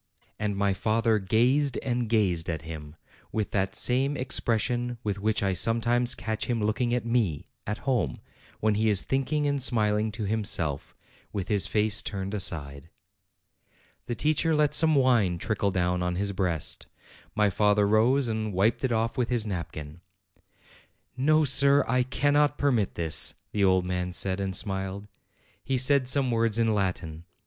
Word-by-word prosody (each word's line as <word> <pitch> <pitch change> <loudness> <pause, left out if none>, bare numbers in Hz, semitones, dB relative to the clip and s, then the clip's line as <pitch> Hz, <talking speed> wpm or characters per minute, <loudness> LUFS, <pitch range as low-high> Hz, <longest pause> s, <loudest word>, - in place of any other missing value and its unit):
And 105 -2 -2
my 100 -1 +1
father 110 +2 0
gazed 125 +8 +1
and 120 -3 -2
gazed 95 -8 0
at 80 -2 -4
him, 80 -2 -9 0.4
with 110 -2 -3
that 95 -1 -1
same 135 +3 +1
expression 120 -1 -1
with 100 -2 -3
which 105 0 -1
I 95 -1 +1
sometimes 120 +4 +1
catch 110 0 -4
him 120 -2 -1
looking 110 +3 -1
at 120 -1 -1
me, 115 -11 -1 0.2
at 105 +1 -3
home, 120 - -1 0.4
when 110 0 +1
he 110 +1 +1
is 100 -3 +2
thinking 140 +3 -1
and 140 -1 -1
smiling 110 -3 +1
to 110 - -5
himself, 95 -9 0 0.4
with 100 -2 -5
his 100 -4 +1
face 105 0 +2
turned 100 -1 -5
aside. 80 -6 0 1.2
The 120 - -3
teacher 155 +3 +1
let 150 -1 +2
some 160 0 +4
wine 120 -10 +2
trickle 100 +2 -1
down 90 -1 -1
on 90 0 -2
his 100 +2 -2
breast; 90 -5 -2 0.5
my 105 -1 +2
father 105 0 +2
rose, 120 +6 +2
and 110 -2 -3
wiped 105 +7 +1
it 130 - 0
off 115 +3 -1
with 120 - 0
his 120 -3 0
nap 90 -5 -4
kin. 75 +2 -10 1.1
"No, 155 +4 +2
sir; 140 +1 +5
I 125 +2 +1
cannot 145 +3 +1
permit 120 -8 0
this," 80 -2 +1 0.2
the 105 - -1
old 95 -1 +3
man 90 0 -3
said, 95 +1 0
and 95 -1 -2
smiled. 95 +1 -2 0.6
He 135 - -1
said 130 +1 +3
some 130 -1 +3
words 115 -1 +1
in 115 -1 +2
Latin. 90 -5 -3
110 Hz, 165 wpm, -26 LUFS, 95-125 Hz, 1.2 s, sir